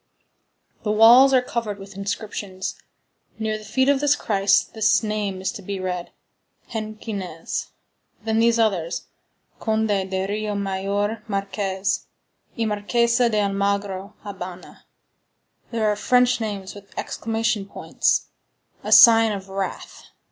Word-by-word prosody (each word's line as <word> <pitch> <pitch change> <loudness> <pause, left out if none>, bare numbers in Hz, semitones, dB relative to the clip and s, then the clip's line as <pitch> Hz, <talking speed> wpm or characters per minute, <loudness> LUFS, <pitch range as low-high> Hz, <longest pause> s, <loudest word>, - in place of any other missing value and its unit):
The 210 - -3
walls 235 +5 +7
are 255 -2 +4
covered 230 -4 -3
with 195 -1 -11
inscriptions. 200 -1 -4 0.6
Near 220 -1 -2
the - - -12
feet 260 +6 +1
of 280 -1 +3 0.2
Christ 200 -2 +2
this 220 +1 +3
name 210 -3 -2
is 190 - -1
to - - -9
be 195 +1 -5
read: 180 -1 -4 0.6
Henquinez. 215 -6 -5 0.6
Then 220 0 0
these 230 0 +4
others: 190 -7 0 0.6
Conde 220 -1 0
de 190 -1 -1
Rio 210 0 -2
Maior 200 +2 -2
Marques 195 -1 -2 0.5
y 230 - 0
Marquesa 235 +3 +2
de 215 -2 +1
Almagro 200 0 -1
(Habana). 185 -3 -9 0.8
There 225 -2 0
are 210 - +2
French 245 +3 +3
names 200 -3 -4
with 200 -1 -15
exclamation 225 -2 -2
points,—a - - -3
sign 225 -1 +8
of 195 -1 -6
wrath. 195 0 -5
205 Hz, 120 wpm, -23 LUFS, 195-225 Hz, 0.8 s, sign